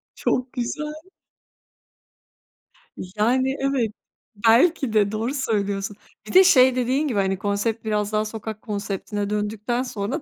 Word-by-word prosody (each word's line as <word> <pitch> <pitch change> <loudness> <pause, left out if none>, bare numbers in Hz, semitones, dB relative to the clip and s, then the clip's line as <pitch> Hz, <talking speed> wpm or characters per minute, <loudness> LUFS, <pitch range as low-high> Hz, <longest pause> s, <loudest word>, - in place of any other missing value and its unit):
Çok 255 0 -1
güzel. 300 +5 -3 2.0
Yani, 240 +8 0
evet. 270 -5 0 0.6
Belki 265 +1 +4
de. 205 -1 +3
Doğru 225 +5 -2
söylüyorsun. 205 -5 -2 0.3
Bir - - -7
de 375 +1 +9
şey 260 -8 +6
dediğin 260 +4 0
gibi, 225 -7 0
hani, 190 -1 0
konsept 210 +3 -2
biraz 210 -1 -1
daha 215 0 +1
sokak 215 0 -6
konseptine 205 -1 -4
döndükten 210 +4 -2
sonra 240 +5 -4
220 Hz, 125 wpm, -23 LUFS, 205-255 Hz, 2.0 s, de